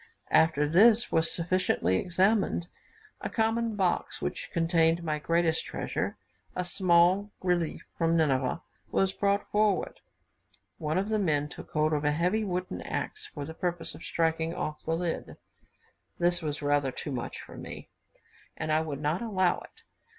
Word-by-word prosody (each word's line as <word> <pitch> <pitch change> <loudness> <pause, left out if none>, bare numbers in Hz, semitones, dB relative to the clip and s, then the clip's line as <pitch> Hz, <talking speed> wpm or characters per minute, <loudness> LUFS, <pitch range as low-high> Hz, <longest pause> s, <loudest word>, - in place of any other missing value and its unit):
After 155 -2 +4
this 215 +8 +5
was 160 0 +3
sufficiently 170 - +1
examined, 185 -1 +1 0.5
a - - -3
common 225 0 0
box, 190 -3 0
which - - -4
contained 165 0 +2
my 155 -2 -1
greatest 165 +1 +1
treasure, - - -3 0.4
a 180 - -1
small 180 +2 +3
relief 175 -3 0 0.2
from 165 0 +3
Nineveh, 135 -1 +1 0.3
was 195 0 +1
brought 200 0 +1
forward. 210 -2 +1 0.8
One 155 0 -1
of 195 +3 0
the 215 -1 +1
men 150 -6 +1
took - - -10
hold 155 0 +2
of 150 0 0
a 150 0 +2
heavy 180 +8 +1
wooden 185 -2 -3
axe, 430 - -4
for 145 -2 -7
the 160 - -7
purpose 175 0 -3
of - - -12
striking 165 0 0
off 150 0 -4
the 160 - 0
lid. 170 -1 -3 0.8
This 175 0 +2
was 150 -1 -3
rather 145 -2 +2
too 145 - -6
much 125 -3 -4
for - - -11
me, - - -8 0.7
and 155 - -2
I 155 +1 +3
would 150 -3 -4
not 155 +6 0
allow 190 -6 +1
it. - - -16
170 Hz, 160 wpm, -29 LUFS, 155-185 Hz, 0.8 s, this